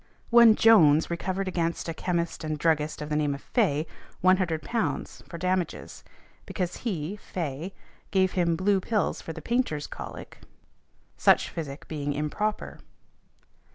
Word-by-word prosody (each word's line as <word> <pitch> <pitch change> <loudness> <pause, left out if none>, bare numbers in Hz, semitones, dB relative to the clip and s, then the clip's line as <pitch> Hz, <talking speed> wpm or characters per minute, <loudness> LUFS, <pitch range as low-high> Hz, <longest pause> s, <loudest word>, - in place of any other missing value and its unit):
One 235 -2 +8
Jones 165 -10 +5
recovered 185 +3 -2
against 170 -2 -2
a 165 - -2
chemist 170 -1 -2
and 155 -1 -2
druggist 150 -1 0
of 150 - -7
the 150 - -1
name 150 -2 +1
of 140 - -10
Fay, 160 - +1 0.4
£100 185 +4 0
for 170 - -7
damages, 185 0 -2 0.4
because 180 -3 -3
he, 190 -4 -3
Fay, 165 -2 -5 0.4
gave 190 -1 +2
him 170 -2 +1
blue 190 +3 +2
pills 210 +2 -1
for - - -6
the - - -9
painters' 235 - 0
colic, - - -9 0.8
such - - +4
physic 145 -4 -7
being 145 -2 -3
improper. 150 +9 -3
170 Hz, 135 wpm, -27 LUFS, 155-195 Hz, 0.8 s, One